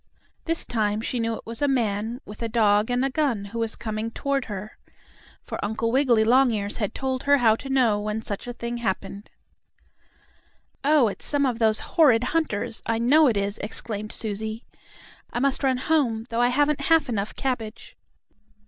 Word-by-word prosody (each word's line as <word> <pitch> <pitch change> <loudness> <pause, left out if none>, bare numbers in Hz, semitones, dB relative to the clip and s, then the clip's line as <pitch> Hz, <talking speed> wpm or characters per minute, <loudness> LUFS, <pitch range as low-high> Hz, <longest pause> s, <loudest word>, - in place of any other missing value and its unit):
This 330 0 0
time 215 -2 0
she 240 +2 -3
knew 230 0 -1
it - - -11
was 230 +2 -6
a 285 - +3
man 230 -2 -1
with 210 +2 -11
a 230 - -2
dog 210 -1 +3
and 245 +2 +1
a - - 0
gun 255 -8 0
who 230 +3 -6
was 225 -1 -1
coming 220 0 -4
toward 275 +2 -2
her. 210 0 -7 0.6
For - - -6
Uncle 220 +2 -1
Wiggily 250 -4 +3
Longears 225 -4 +2
had 210 -2 -3
told 260 -1 -2
her 285 0 +5
how 225 -4 +4
to 270 - -8
know 245 -6 +3
when 210 +1 -3
such 205 +3 -5
a 245 - -4
thing 235 0 -5
happened. 200 -2 -4 1.5
"Oh, 290 -3 +4
it's 205 - -4
some 285 -1 +2
of 245 -3 -1
those 220 -2 +3
horrid 255 -8 +4
hunters; 255 -7 -1
I 230 0 +1
know 285 +7 +5
it 225 -5 +1
is!" 200 +1 -2
exclaimed 215 0 -3
Susie. 220 +1 -3 0.7
"I - - -4
must 275 +2 +1
run 260 -2 +2
home, 250 -6 0
though 230 +1 0
I 245 - +4
haven't 285 +3 +1
half 325 +2 +3
enough 210 -4 -3
cabbage." 235 -4 -4
230 Hz, 185 wpm, -24 LUFS, 215-265 Hz, 1.5 s, her